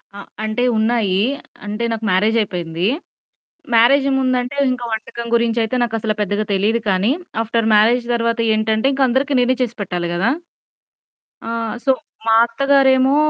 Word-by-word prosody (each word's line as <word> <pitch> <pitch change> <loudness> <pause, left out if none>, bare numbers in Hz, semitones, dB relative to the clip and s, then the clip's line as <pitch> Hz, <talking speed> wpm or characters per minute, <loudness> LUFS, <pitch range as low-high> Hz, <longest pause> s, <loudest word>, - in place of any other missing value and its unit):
ఆ! - - -8 0.2
అంటే 220 +3 -1
ఉన్నాయీ. 220 -4 +1 0.4
అంటే 210 +3 -4
నాకు 225 -1 -3
మ్యారేజైపోయింది. 185 -4 0 0.9
మ్యారేజ్ 270 +5 +5
ముందంటే 255 +1 -1
ఇంక 250 -1 -3
వంటకం 220 +2 -5
గురించైతే 230 0 +1
నాకసల 225 -2 -1
పెద్దగా 205 +1 -1
తెలీదు 210 +4 +1
కానీ, 195 +5 +2 0.3
ఆఫ్టర్ 225 0 -1
మ్యారేజ్ 230 +3 +4
తర్వాత 230 0 -1
ఏంటంటే, 220 +2 +1
ఇంక 270 - -2
అందరికి 270 +3 0
నేనే 250 +1 +2
చేసి 240 -2 -2
పెట్టాలి 175 -2 -3
కదా! 185 +7 +1 1.2
ఆహ్, 230 -1 -3
సో 270 - +4 0.4
మా 225 - +4
అత్తగారేమో 270 +1 +3
230 Hz, 130 wpm, -18 LUFS, 215-245 Hz, 1.2 s, మ్యారేజ్